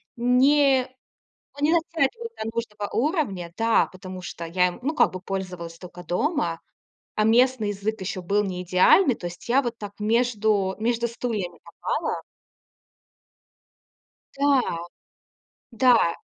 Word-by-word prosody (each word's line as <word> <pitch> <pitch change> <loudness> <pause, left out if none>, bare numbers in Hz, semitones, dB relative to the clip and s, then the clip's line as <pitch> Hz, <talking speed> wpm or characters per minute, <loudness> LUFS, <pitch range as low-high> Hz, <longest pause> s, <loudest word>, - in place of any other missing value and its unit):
не 260 +2 +4 0.7
ну, 295 - +3
не 315 - +2
дотягивал 335 - 0
до - - -2
нужного 210 -3 -4
уровня. 235 - -1
Да, 225 0 +3
потому 185 0 -9
что 170 -1 -6
я 180 +2 +2
им, 180 - -8
ну, 300 +5 -1
как 240 - +3
бы, 185 - -6
пользовалась 180 -3 -5
только 180 0 -10
дома. 290 - -1 0.6
А 215 - +2
местный 240 -1 +3
язык 205 +2 -3
ещё 190 0 -4
был 200 +4 +1
не 180 -2 -4
идеальный. 185 - +5
То 175 - -6
есть 175 +6 -10
я 260 +3 +4
вот 240 -3 -4
так 205 -2 -7
между 215 -3 +1
между 235 +1 0
стульями 215 -7 -4
попала. 170 - -3 2.1
Да, 280 -1 +3 1.1
да, 230 -7 +4
220 Hz, 135 wpm, -24 LUFS, 185-255 Hz, 2.1 s, идеальный